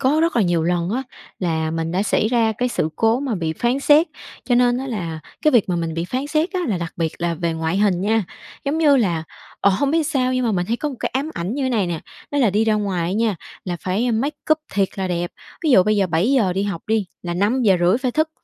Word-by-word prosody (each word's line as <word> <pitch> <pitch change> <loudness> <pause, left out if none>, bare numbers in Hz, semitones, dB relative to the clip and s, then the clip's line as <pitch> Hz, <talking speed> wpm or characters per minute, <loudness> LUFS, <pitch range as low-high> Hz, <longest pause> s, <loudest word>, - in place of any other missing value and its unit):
có 285 +4 +3
rất 330 -3 +1
là 235 - +4
nhiều 175 -3 +1
lần 175 +1 0
á 250 +5 -1 0.4
là 160 -3 -1
mình 165 0 -2
đã 185 +2 +1
xảy 210 +1 +1
ra 230 -2 +2
cái 250 - +1
sự 160 - -1
cố 225 +3 +2
mà 270 -5 -1
bị 165 -4 -2
phán 240 - 0
xét, 295 +4 +5 0.4
cho 245 - +1
nên 245 0 +3
á 265 - -4
là 170 -10 -4 0.2
cái 305 - +5
việc 230 -6 +4
mà 180 - 0
mình 165 -1 -2
bị 165 +1 -2
phán 255 +9 -3
xét 310 +4 0
á 370 - -1
là 200 -5 0
đặc 170 -1 -5
biệt 165 -1 -1
là 170 0 -1
về 165 +1 -1
ngoại 160 +2 -1
hình 200 -4 +2
nha. 215 +2 +1 0.4
Giống 285 +3 0
như 295 -3 +5
là, 175 -10 +1 0.4
ờ, 200 - +4
hông 245 +9 +1
biết 325 - +2
làm 320 - +1
sao 255 -3 0
nhưng 255 -1 0
mà 225 - +1
mình 180 -2 0
thấy 230 - 0
có 300 - -2
một 275 - -7
cái - - -1
ám 280 +4 -1
ảnh 180 +7 -3
như 270 -2 -1
này 220 -7 +1
nè, 170 -2 -3 0.3
đó 285 - -1
là 245 -7 +4
đi 210 +3 +2
ra 220 -1 +2
ngoài 190 -5 -1
á - - -2
nha, 215 -1 +1 0.3
là 175 -2 -3
phải 205 +7 0
make 275 +7 -1 0.2
up 310 - +2 0.2
thiệt 195 -1 +2
là 190 -1 -1
đẹp. 175 0 -2 0.3
Ví 310 - +3
dụ 190 -8 +7
bây 215 +2 +1
giờ 195 -2 +2
7:00 190 +5 +2
đi 190 +2 -1
học 200 -5 -3
đi, 220 -2 +1 0.2
là 175 -1 -3
5:30 200 -2 +3
phải 260 -1 -1
thức, 310 +4 +1
210 Hz, 275 wpm, -21 LUFS, 175-255 Hz, 0.4 s, dụ